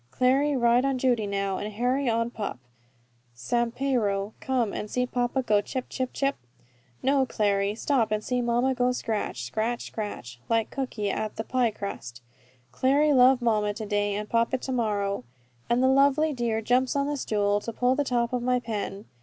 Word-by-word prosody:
Clary 270 - +2
ride 240 +1 +4
on 270 -1 +1
Judy 245 -5 +1
now, 200 -1 -1
and 210 +1 -4
Harry 250 +4 0
on 230 +1 0
pup 210 - -4 0.8
Sampiero, 235 - 0
and - - -29
come 250 -5 0
and 210 - -4
see 250 +3 0
papa 250 +1 -1
go 210 -4 +3
chip, 255 +4 -4
chip, 255 -1 -2
chip?" 275 0 -1 0.7
"No, 275 0 +3
Clary 200 -2 0
stop 235 -2 +1
and 215 0 0
see 250 +1 -1
mamma 240 +2 +1
go 250 0 +1
scratch, 215 - -3
scratch, 220 - -2
scratch, 130 - -6
like 225 -1 +1
Cooky 230 -7 -2
at 215 +1 -3
the 220 - -3
pie 250 0 +1
crust. 125 - -7 0.5
Clary 280 - +3
love 255 -1 +5
mamma 210 -3 +1
to 220 - -5
day, 205 -1 0
and 210 +1 -4
papa 230 +3 +1
to 260 - -5
morrow." 205 - -1 0.5
And 240 +2 +2
the - - +5
lovely 280 +3 +4
dear 230 -3 -1
jumps 250 +4 +2
on 280 0 +1
the 290 +1 -1
stool, 205 -5 0
to 230 - -5
pull 250 +3 +2
the 290 +2 +1
top 240 -2 0
of 250 - 0
my 250 +1 +1
pen. 210 -3 -5
235 Hz, 185 wpm, -26 LUFS, 210-255 Hz, 0.8 s, love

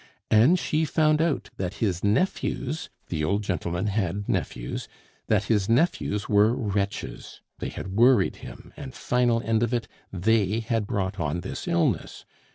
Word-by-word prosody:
and 120 +12 +6
she 155 -2 0
found 155 0 +2
out 140 -11 -1
that 95 0 -3
his 95 -5 -1
nephews 150 - 0 0.2
the 80 -3 -2
old 100 +6 0
gentleman 90 -1 -2
had 100 -1 -1
nephews - - -3 0.4
that 105 -2 +2
his 105 -2 +1
nephews 115 -5 +1
were 105 +3 +4
wretches; 100 -5 -3 0.2
they - - -3
had - - -6
worried 120 +6 +4
him, - - -11
and 130 -2 -8
final 120 -2 +1
end 115 0 +1
of 120 +1 +1
it, 115 -2 -2 0.2
they 105 +2 +2
had 115 -2 -1
brought 100 -4 -2
on 85 +1 -1
this - - -6
illness. 85 - 0
105 Hz, 155 wpm, -26 LUFS, 95-120 Hz, 0.4 s, and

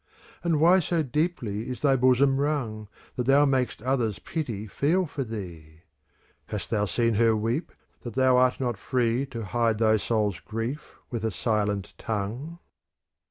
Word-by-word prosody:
And 165 -3 +1
why 175 +4 +6
so 170 -1 0
deeply 130 - -2
is 125 - -6
thy 140 -2 +5
bosom 130 +2 +4
wrung, 130 -8 -1
® - - -19 0.3
That 125 -1 -2
thou 140 +2 +6
mak'st 130 -5 0
others 125 -5 0
pity 120 -11 -4
feel 160 - +1
for 145 -3 -4
thee? 85 -9 -8 0.7
Hast 105 - -5
thou 105 -2 +2
seen 115 +2 +1
her 115 +1 +3
weep, 115 +9 -1 0.3
that 120 - -7
thou 130 -1 +4
art 125 0 +3
not 120 -5 -2
free 125 +2 0
To 115 -4 -6
hide 115 +1 +1
thy 110 0 +4
soul's 105 -3 0
grief 115 +7 -5 0.2
with 115 -3 -3
a 110 - +1
silent 105 -2 -1
tongue 115 +10 -4
120 Hz, 160 wpm, -26 LUFS, 110-135 Hz, 0.7 s, why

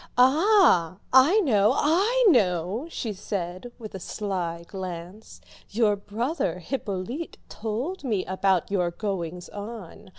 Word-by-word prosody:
"Ah, 265 - +5 0.2
I 295 +12 +6
know, 215 - +3
I 405 +11 +2
know," 200 - +1
she 225 -9 -4
said 185 +2 -5
with 215 -2 -9
a 190 - -6
sly 175 -4 -4
glance, 185 +2 -8 0.3
"your 215 -1 +2
brother 210 - -2
Hippolyte 220 - -4
told 235 - -4
me 215 -8 -1
about 190 -1 0
your 180 -3 +1
goings 180 -2 -4
on. 205 -3 -9
205 Hz, 120 wpm, -26 LUFS, 185-260 Hz, 0.3 s, I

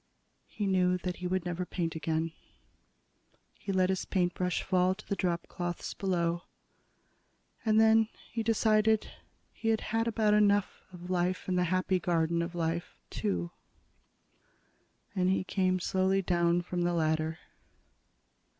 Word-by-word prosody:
He 210 - -4
knew 180 -1 +2
that 180 0 -4
he 180 - -4
would 185 0 -1
never 175 0 -2
paint 170 -2 -3
again. 160 0 -1 1.2
He 195 - -6
let 185 -1 +2
his 190 - -1
paintbrush 180 -1 0
fall 185 0 +2
to 215 - -14
the 200 - -1
dropcloths 175 -1 -3
below. 175 -3 0 1.2
And 220 -1 +3
then 220 0 +5 0.2
he 230 - -2
decided 220 -1 +2 0.4
he 225 - -5
had 220 -1 +2
had 225 +1 +1
about 220 -2 +2
enough 205 -1 +3
of 180 0 -8
life 180 0 0
in 185 - 0
the 180 0 +2
Happy 185 +1 +1
Garden 170 -1 +1
of 170 +1 -4
Life, 170 +1 -2
too, 195 -5 -2 1.6
and 185 -1 +2
he 190 - +1
came 185 -1 +1
slowly 190 +2 +1
down 175 -1 +2
from 175 0 -3
the 175 0 +1
ladder. 160 0 0
180 Hz, 140 wpm, -30 LUFS, 175-195 Hz, 1.6 s, then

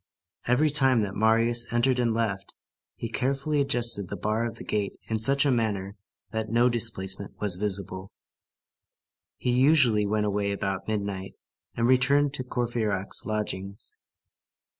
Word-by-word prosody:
Every 140 +5 +3
time 135 -5 +4
that 100 -2 -3
Marius 115 +2 +2
entered 125 +2 +1
and 120 -2 +1
left, 110 -4 -3 0.4
he 115 - -5
carefully 140 +5 -1
adjusted 120 -8 +1
the 100 - -5
bar 110 +5 -1
of 115 - -7
the - - -9
gate 105 -2 -3
in 110 -1 -1
such 140 +6 +3
a 140 - +3
manner 105 -5 -1 0.4
that 110 -1 -3
no 120 +2 +3
displacement 100 -5 -1
was 100 -4 +3
visible. 95 0 -3 1.3
He 125 - -1
usually 125 -5 +4
went 105 +1 0
away 100 0 -1
about 95 -1 -3
midnight, 100 -3 -4 0.4
and 115 - +1
returned 135 +3 +3
to 130 - -2
Courfeyrac's 115 -6 -2
lodgings. 100 -2 -5
115 Hz, 140 wpm, -26 LUFS, 100-125 Hz, 1.3 s, time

